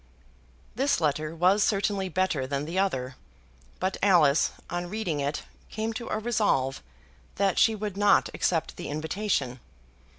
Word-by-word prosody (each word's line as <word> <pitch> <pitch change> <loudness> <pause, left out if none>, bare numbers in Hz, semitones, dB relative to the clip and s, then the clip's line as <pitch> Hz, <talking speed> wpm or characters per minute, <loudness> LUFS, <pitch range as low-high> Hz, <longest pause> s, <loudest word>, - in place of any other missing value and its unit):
This 275 +5 +1
letter 155 0 -1
was 185 +5 +4
certainly 200 -2 0
better 170 -7 0
than 140 +1 -2
the 170 +4 -2
other, 130 -10 -1 0.6
but 190 +1 -1
Alice, 165 -7 +4 0.2
on 175 0 -4
reading 185 -7 -2
it, 140 +1 -2 0.3
came 220 +1 -3
to 235 +1 -6
a - - -1
resolve 210 - 0 0.5
that 195 -1 +1
she 225 - +4
would 210 -2 -5
not 205 0 +4
accept 165 -3 -1
the - - -6
invitation. 155 - -2
185 Hz, 140 wpm, -27 LUFS, 150-205 Hz, 0.6 s, was